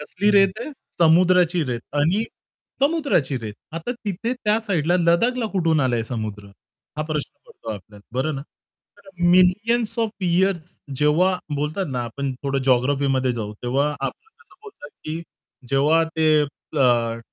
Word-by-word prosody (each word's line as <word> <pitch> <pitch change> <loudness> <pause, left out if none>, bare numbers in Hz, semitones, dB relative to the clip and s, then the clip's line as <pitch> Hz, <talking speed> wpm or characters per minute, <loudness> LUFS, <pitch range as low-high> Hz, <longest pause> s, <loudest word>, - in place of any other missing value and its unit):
कसली 190 +7 0
रेत 195 -2 +5
आहे, 275 - -5 0.3
समुद्राची 175 +1 +4
रेत 120 -3 -3 0.2
आणि 175 +10 +2 0.6
समुद्राची 280 - +1
रेत. 110 -3 -7 0.2
आता 165 +8 -4
तिथे 225 0 -3
त्या 220 -4 +1
साइडला 175 -3 +2
लदाखला 225 +8 +2
कुठून 165 -5 +2
आलाय 120 -4 +1
समुद्र, 110 -4 -5 0.5
हा 155 - -1
प्रश्न 155 -2 -3 0.2
पडतो 440 -4 -9
आपल्याला 105 +1 -13 0.2
बरं 155 +3 0
ना? 135 - -5 0.6
तर 200 -1 -19 0.2
मिलियन्स 210 +6 +3
ऑफ 225 -2 +1
इअर्स 185 0 +2 0.4
जेव्हा 170 +6 +3 0.2
बोलतात 150 +6 -2
ना 125 -1 -1
आपण 135 +4 -4
थोडं 135 -1 -1
जिओग्राफीमध्ये 130 0 +2
जाऊ, 110 -3 -4
तेव्हा 135 +4 +1
आपण 135 - -5
कसं - - -22
बोलतात 405 - -12
की 160 +2 -4 0.5
जेव्हा 145 +5 +3
ते 155 -1 +4
अ, 120 -5 0
160 Hz, 140 wpm, -22 LUFS, 135-190 Hz, 0.6 s, रेत